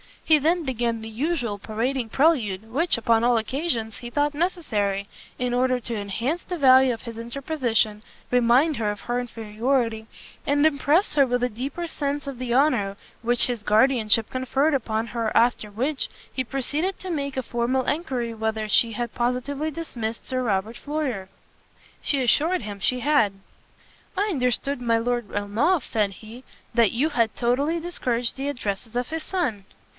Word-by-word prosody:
He 310 -2 +5
then 330 +4 +2
began 235 -4 -1
the 220 - -7
usual 240 -3 -2
parading 230 +4 -2
prelude, 225 - +1
which, 315 +3 +3
upon 230 0 +3
all 240 0 +4
occasions, 230 -3 -2
he 240 - -7
thought 290 +3 +1
necessary, 220 - -1 0.3
in 250 -1 -1
order 255 0 +2
to 235 0 -4
enhance 230 - -2
the 360 - -5
value 260 -3 +6
of 225 - -8
his 230 -2 -8
interposition, 235 -3 -1 0.3
remind 250 +5 +4
her 215 -2 0
of 205 0 -4
her 240 0 -1
inferiority, 225 0 -1 0.4
and 290 +1 +3
impress 310 +5 +3
her 280 -2 +5
with 245 0 0
a 250 - +2
deeper 270 +9 -4
sense 285 -3 -3
of 270 -3 -6
the 250 -2 -2
honour 245 -8 +2 0.3
which 240 0 +2
his 240 -3 -3
guardianship 220 0 +3
conferred 265 +4 +1
upon 225 -4 -1
her 230 -2 -2
after 235 -2 +3
which, 260 +7 -1 0.3
he 260 - -2
proceeded 290 +9 -1
to 375 - -6
make 280 -4 -2
a 260 - -1
formal 245 +2 0
enquiry 255 -6 -2
whether 220 -1 -2
she 230 +2 +4
had 240 +1 -3
positively 255 +5 -1
dismissed 240 -8 -5
Sir 255 0 0
Robert 215 0 -1
Floyer? 285 -10 -3 0.7
She 275 -3 +1
assured 315 +8 +3
him 205 -2 -7
she 250 +5 +1
had. 235 -7 +3 0.8
"I 410 +2 +1
understood 250 - 0
my 230 -1 +2
Lord 240 -1 -1
Ernolf," 225 - +1
said 210 -3 0
he, 225 +5 -12 0.3
"that 230 -3 +4
you 275 +7 +1
had 230 -7 +1
totally 280 +8 +1
discouraged 250 -9 -2
the 270 +1 -3
addresses 225 -4 -4
of 245 0 -1
his 320 0 -4
son?" 255 - -2
245 Hz, 165 wpm, -24 LUFS, 225-285 Hz, 0.8 s, value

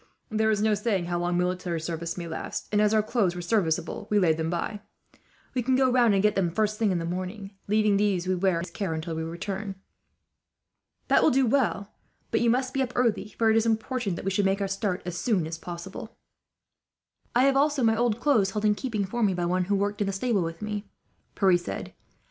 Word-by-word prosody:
There 220 0 +2
is 210 -1 +1
no 220 -1 +3
saying 205 -3 0
how 175 0 -2
long 175 0 0
military 180 -1 -1
service 170 +1 -4
may 170 -1 -5
last 160 - -5
and, 210 0 +3
as 210 0 +3
our 215 -1 +3
clothes 210 -6 0
were 175 - -4
serviceable, 175 0 0
we 210 - +2
laid 165 -5 +3
them 160 0 -1
by. 190 +5 -3 0.7
We 255 - 0
can 260 +2 +1
go 260 -1 +3
round 240 -4 +4
and 195 - +2
get 210 -1 +4
them, 195 -3 +1
the 165 - -13
first 215 -1 0
thing 215 -3 +2
in 180 - +1
the 165 - -3
morning; 185 +3 -5 0.2
leaving 210 -1 +3
these 200 -3 +1
we 185 - +2
wear 185 0 +1
in - - -2
his - - -8
care, 190 -6 -3
until 160 +1 -4
we 160 - -3
return." 190 +5 -4 1.3
"That - - +4
will - - +5
do 270 -1 +3
well; 220 -5 0 0.4
but 225 - +2
you 235 - +3
must 255 +2 +1
be 270 - 0
up 250 -2 -2
early, 230 -4 0
for 225 -1 +3
it - - +3
is 225 0 +3
important 225 -4 -1
we 195 - 0
should 200 +2 +1
make 195 +1 +1
our 200 - -1
start 195 -1 -2
as 180 -1 -4
soon 205 -8 +1
as 165 +1 -6
possible." 175 +6 -8 1.2
"I 255 +3 +5
also 280 0 +2
have - - +4
my 225 0 +4
old 235 -1 +1
clothes 240 -8 +3
held 210 0 -1
in 210 - +5
keeping 215 -3 -2
for 235 +5 -4
me, 200 -4 +2
by 175 -1 -1
one 180 +1 +1
who 200 +2 +1
worked 205 +1 -1
in 205 - +1
the 195 - -1
stable 210 0 0
with 165 +4 -4
me," 210 0 -4 0.5
Pierre 190 -3 +4
said. 175 - -6
200 Hz, 235 wpm, -27 LUFS, 180-225 Hz, 1.3 s, will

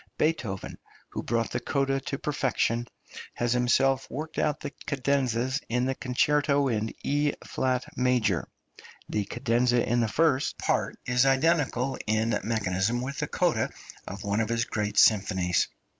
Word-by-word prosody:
Beethoven, 120 - -1 0.3
who - - -4
brought 115 -1 -1
the - - -1
coda 135 -1 0
to 135 +1 -4
perfection, 125 -5 0 0.5
has 120 0 0
himself 130 +2 +2
worked 155 +2 -5
out 150 -1 +1
the 145 - -5 0.2
cadenzas 130 -1 0
in 125 +2 +1
the 135 - 0
Concerto 140 +2 +1
in 110 -1 -1
E 145 +1 +1
flat 130 -1 -1
major; 125 -8 +1 0.6
the 105 -1 -1
cadenza 120 +1 +1
in 120 +1 +2
the 115 - +2
first 145 +2 +1
part - - -1
is 125 +2 +3
identical 135 -2 +2
in 110 +2 +1
mechanism 110 0 0
with 140 +2 -5
the - - -1
coda - - +1 0.4
of 100 +1 -7
one 100 +1 0
of 110 - -2
his 115 0 +1
great 105 -1 -3
symphonies. 95 -4 +4
125 Hz, 145 wpm, -27 LUFS, 115-135 Hz, 0.6 s, symphonies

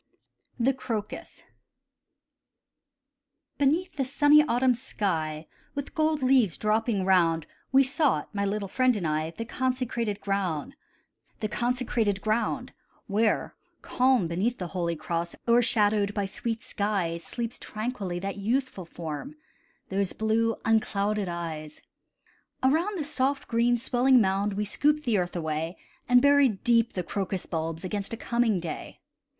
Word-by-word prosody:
THE 260 +3 +3
CROCUS 225 -5 -5 2.2
Beneath 315 +6 +1
the 275 - +1
sunny 290 +3 +5
autumn 255 -2 +2
sky, 160 -10 -2 0.3
With 285 -1 -5
gold 310 -2 +1
leaves 255 -9 +3
dropping 215 -2 +1
round, 165 -4 +3 0.3
We 270 +1 +6
sought, 275 -1 0
my 200 -1 -1
little 200 0 -1
friend 255 +4 +2
and 195 -5 -3
I, 155 0 0
The 230 - -4
consecrated 240 -4 -2
ground, 195 - -2 2.3
Where, 215 +1 +1 0.3
calm 255 -7 +2
beneath 200 +9 -1
the 180 -2 -5
holy 170 -2 -1
cross, 170 +2 -3
O'ershadowed 215 -3 +3
by 205 -2 0
sweet 225 +3 -4
skies, 185 -5 -1
Sleeps 235 0 -5
tranquilly 215 -5 -4
that 195 +3 -4
youthful 230 -1 -1
form, 165 - -6 0.5
Those 195 0 -1
blue 225 +1 +1
unclouded 210 -2 +1
eyes. 160 -3 -5 0.8
Around 335 +10 +2
the 315 - -2
soft, 275 0 -1
green 235 +1 +2
swelling 255 +1 +3
mound 200 0 +1
We 210 +1 -1
scooped 295 +8 +1
the 230 -7 +2
earth 175 0 -3
away, 160 +1 -3 0.3
And 245 0 +6
buried 280 -7 +4
deep 235 -1 +3
the 180 - -2
crocus 190 +1 -3
bulbs 165 0 -3
Against 200 +3 -3
a - - -3
coming 235 -4 +1
day. 165 -2 -7
215 Hz, 125 wpm, -27 LUFS, 185-255 Hz, 2.3 s, We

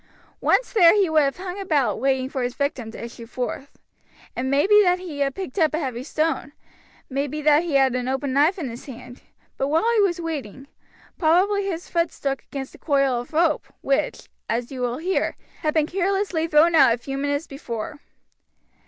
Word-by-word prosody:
Once - - +2
there 360 -5 +7
he 390 -5 +2
would 310 -1 +5
have 275 -2 0
hung 370 +1 -6
about 285 - +1
waiting 265 0 +1
for 265 -1 -4
his 245 0 -2
victim 275 -5 -2
to 225 - -9
issue 235 0 -10
forth. 255 +3 -5 0.6
It - - -2
may 275 +2 +2
be 420 +1 +6
that 360 -2 +3
he 345 -6 -7
had 275 -1 0
picked 380 -2 -5
up 310 -2 +3
a - - -1
heavy 255 -6 -3
stone, 310 0 -2 0.5
may 275 +1 -2
be 300 +3 -5
that 300 +1 +5
he 335 -4 -2
had 270 -2 +4
an 250 0 -2
open 265 +1 -1
knife 300 +8 +3
in 320 -7 -3
his 235 0 -8
hand; 245 -1 -11 0.4
but 270 - 0
while 320 +7 +1
he 455 - +3
was 360 -3 +1
waiting, 280 -7 -5 0.5
probably 390 +5 +3
his 350 -3 -4
foot 335 -1 0
struck 275 -1 -3
against 270 -1 -7
a - - -15
coil 275 -4 +1
of 245 - -13
rope, 320 -1 +1
which, 275 0 -1 0.2
as 235 +2 -2
you 260 -2 -6
will 245 0 -1
hear, 365 +4 -1 0.2
had 305 0 -1
been 310 -2 +3
carelessly 380 -1 0
thrown 320 +2 +4
out 275 -7 +6
a - - -12
few 270 +3 -6
minutes 285 +2 -1
before. 275 0 -6
285 Hz, 205 wpm, -23 LUFS, 265-335 Hz, 0.6 s, there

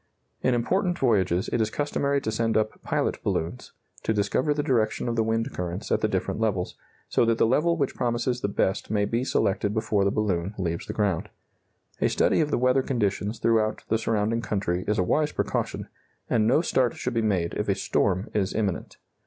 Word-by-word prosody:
In 130 - +2
important 180 - +1
voyages 95 -8 +2
it 115 - +2
is 110 - +1
customary 140 +1 0
to 110 - -2
send 115 0 +1
up 110 0 -1
pilot - - -1
balloons, 80 -5 -2 0.3
to 110 - 0
discover 105 +8 +1
the 145 0 0
direction 115 -5 +1
of 120 - -1
the 115 - +2
wind 115 +1 -1
currents 90 0 -4
at - - +2
the - - +3
different - - -2
levels, 105 -5 -1 0.3
so - - +2
that 115 -1 +2
the - - +4
level 160 +8 +2
which 140 -4 0
promises 120 +1 -1
the - - 0
best 100 0 -1
may 105 -1 +1
be 115 +4 -1
selected 100 -4 0
before 105 -2 +1
the 100 - +3
balloon 100 -2 -1
leaves 85 -3 -3
the - - -4
ground. 100 -6 0 0.7
A - - +2
study - - +2
of 150 - 0
the - - +1
weather 125 +2 +3
conditions 105 -4 -1
throughout 110 -2 +1
the 110 - +2
surrounding 110 +1 0
country 95 -5 -1
is 105 - +1
a 90 - +3
wise 150 +11 +1
precaution, - - -2 0.4
and 110 -2 +2
no 130 +7 +4
start 130 -7 +1
should 125 - -3
be 115 - +1
made 95 -6 0
if - - -2
a - - +3
storm 95 0 0
is 100 -3 0
imminent. 100 -5 -2
110 Hz, 200 wpm, -26 LUFS, 100-120 Hz, 0.7 s, the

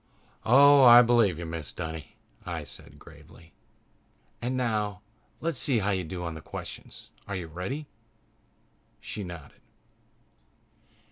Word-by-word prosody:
"Oh, 140 +3 +7
I 120 0 +9
believe 115 -7 +3
you, 85 - -6
Mrs. 80 -7 -6
Dunny," 80 -1 -7 0.3
I - - -5
said - - -15
gravely. 85 0 -17 0.9
"And 125 +2 -2
now, 105 -6 -1 0.4
let's 165 -5 0
see 130 -4 +2
how 105 -1 0
you 95 -2 -1
do 90 +2 -6
on 85 -1 -4
the 80 - -9
questions. - - -10 0.2
Are 100 - -4
you 90 -3 -4
ready?" 90 - -5 1.1
She 105 - -7
nodded. 85 -5 -10
100 Hz, 130 wpm, -27 LUFS, 85-120 Hz, 1.1 s, I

